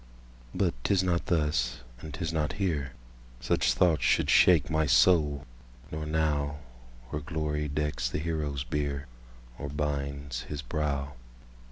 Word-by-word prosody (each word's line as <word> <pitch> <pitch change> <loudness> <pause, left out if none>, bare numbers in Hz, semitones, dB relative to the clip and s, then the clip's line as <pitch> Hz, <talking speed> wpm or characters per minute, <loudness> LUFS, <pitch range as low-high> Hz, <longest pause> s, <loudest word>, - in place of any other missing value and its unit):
But - - +2
'tis 95 -2 +2
not 85 -2 0
thus—and 65 -3 -1
'tis 80 +4 -3
not 80 +2 0
here—Such - - -2
thoughts 85 -4 +3
should - - +3
shake 80 -6 +6
my 80 -1 +1
soul, 75 -1 +4 0.5
nor 75 0 -4
now, 75 -2 0 0.5
Where 75 - -3
glory 75 0 -2
decks 75 -4 -1
the - - -2
hero's 75 -3 -2
bier, 70 -1 -2 0.5
Or 70 - -4
binds 70 -3 -3
his 70 +3 -6
brow. 70 0 -2
75 Hz, 125 wpm, -29 LUFS, 70-80 Hz, 0.5 s, shake